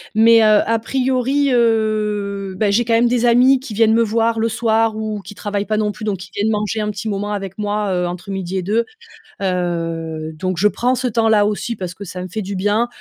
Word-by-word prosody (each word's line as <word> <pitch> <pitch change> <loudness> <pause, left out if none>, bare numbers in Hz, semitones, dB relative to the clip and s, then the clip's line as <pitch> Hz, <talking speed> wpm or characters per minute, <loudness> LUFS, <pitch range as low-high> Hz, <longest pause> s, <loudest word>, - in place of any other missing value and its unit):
Mais, 225 +1 +6
heu, 215 -1 +5
à 230 0 +1
priori, 265 +3 0
heu, 210 -4 0
bah, 205 0 +1
j'ai 230 +4 +2
quand 230 0 -1
même 230 +1 +4
des 245 0 +1
amis 250 +3 +5
qui 260 -4 -8
viennent 220 +1 +3
me 230 +1 +4
voir 225 +1 0
le 230 +1 +1
soir 225 -1 +1
ou 215 -1 -4
qui 195 +2 -11
travaillent 205 0 -3
pas 215 0 -1
non 210 -1 0
plus 205 - -11
donc 210 -2 -1
qui 180 0 -11
viennent 210 +2 0
manger 210 0 -1
un 210 - -1
petit 210 +1 -5
moment 205 0 -2
avec 195 -2 -5
moi, 210 -1 -1
heu, 180 -1 0
entre 175 +2 -6
midi 190 -1 -3
et 185 - -2
deux. 220 +5 +1 0.6
Heu, 165 -4 -2
donc 185 +3 -3
je 200 +5 +4
prends 245 +4 0
ce 255 - -1
temps 225 -1 +1
là 210 -2 +4
aussi 210 +3 -2
parce 180 -3 -6
que 200 - -10
ça 180 0 -7
me - - -6
fait 215 +5 -4
du 200 0 -5
bien. 205 +5 +1
210 Hz, 240 wpm, -19 LUFS, 195-230 Hz, 0.6 s, Mais